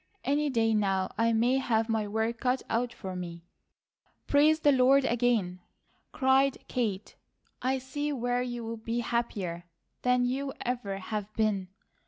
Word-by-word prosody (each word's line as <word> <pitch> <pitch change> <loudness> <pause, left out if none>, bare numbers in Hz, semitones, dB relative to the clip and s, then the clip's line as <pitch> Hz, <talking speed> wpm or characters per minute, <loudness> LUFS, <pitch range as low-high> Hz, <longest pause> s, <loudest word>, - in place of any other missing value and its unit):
Any 290 +2 +1
day 225 -3 +2
now 195 -3 0
I 230 +2 +2
may 240 +4 +3
have 225 -4 +1
my 220 -2 0
work 220 +2 -1
cut 255 0 0
out 235 +1 0
for 190 -5 -7
me." 170 -2 -6 0.8
"Praise 305 +2 +4
the 290 - +5
Lord 265 +1 +5
again!" 230 -7 +1 0.5
cried 265 0 +3
Kate. 215 -5 -2 0.5
"I 260 +1 +1
see 290 +3 -3
where 245 -2 0
you 240 -1 -4
will 230 0 -4
be 230 +2 -2
happier 200 -8 -2 0.4
than 250 0 +3
you 270 +2 -2
ever 235 -6 -2
have 210 +1 -4
been. 210 -4 +1
235 Hz, 150 wpm, -29 LUFS, 215-260 Hz, 0.8 s, the